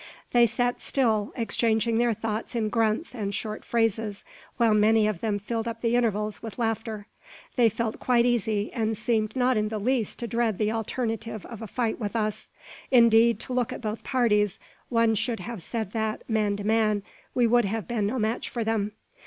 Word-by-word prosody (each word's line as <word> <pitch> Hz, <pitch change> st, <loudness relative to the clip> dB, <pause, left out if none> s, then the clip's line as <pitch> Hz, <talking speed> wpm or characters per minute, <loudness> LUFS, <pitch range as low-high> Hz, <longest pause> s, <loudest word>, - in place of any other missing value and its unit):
They 240 Hz, -1 st, +6 dB
sat 245 Hz, +2 st, -1 dB
still, 220 Hz, -6 st, +1 dB
exchanging 225 Hz, 0 st, +1 dB
their 240 Hz, -2 st, +2 dB
thoughts 220 Hz, +3 st, -4 dB
in 220 Hz, -2 st, 0 dB
grunts 225 Hz, +6 st, 0 dB
and 210 Hz, -5 st, -3 dB
short 215 Hz, 0 st, -4 dB
phrases, 225 Hz, -3 st, 0 dB, 0.3 s
while 230 Hz, -3 st, +4 dB
many 215 Hz, +1 st, +4 dB
of 210 Hz, -5 st, -1 dB
them 215 Hz, -3 st, 0 dB
filled 225 Hz, +3 st, -3 dB
up 230 Hz, 0 st, -5 dB
the 235 Hz, 0 st, +2 dB
intervals 215 Hz, -3 st, 0 dB
with 225 Hz, -2 st, -7 dB
laughter. 225 Hz, -2 st, -2 dB, 0.5 s
They 240 Hz, -3 st, +5 dB
felt 225 Hz, +1 st, -3 dB
quite 240 Hz, -2 st, +3 dB
easy, 220 Hz, -3 st, 0 dB
and 220 Hz, -1 st, -1 dB
seemed 215 Hz, -2 st, 0 dB
not 255 Hz, -1 st, +2 dB
in 215 Hz, 0 st, +1 dB
the 220 Hz, -, -3 dB
least 230 Hz, +1 st, 0 dB
to 235 Hz, -, -4 dB
dread 230 Hz, -2 st, 0 dB
the 215 Hz, 0 st, +1 dB
alternative 225 Hz, -1 st, -3 dB
of 230 Hz, -2 st, -9 dB
a 225 Hz, -, -5 dB
fight 230 Hz, +2 st, -1 dB
with 210 Hz, -1 st, -3 dB
us. 215 Hz, -2 st, -2 dB, 0.4 s
Indeed, 235 Hz, -2 st, +5 dB
to 255 Hz, -, -6 dB
look 250 Hz, -2 st, 0 dB
at -, -, -6 dB
both 215 Hz, -1 st, -4 dB
parties, 215 Hz, -6 st, +2 dB, 0.3 s
one 230 Hz, -2 st, +3 dB
should 225 Hz, +2 st, -1 dB
have 235 Hz, -5 st, -6 dB
said 220 Hz, +2 st, -4 dB
that, 220 Hz, -1 st, -2 dB
man 215 Hz, -3 st, +1 dB
to 205 Hz, -, -5 dB
man, 215 Hz, -1 st, +2 dB, 0.3 s
we 245 Hz, -, +4 dB
would 240 Hz, 0 st, +4 dB
have 215 Hz, -1 st, -3 dB
been 220 Hz, -4 st, 0 dB
no 245 Hz, +5 st, -2 dB
match 220 Hz, 0 st, -1 dB
for 235 Hz, -, -2 dB
them. 215 Hz, -2 st, -1 dB
225 Hz, 195 wpm, -26 LUFS, 215-235 Hz, 0.5 s, They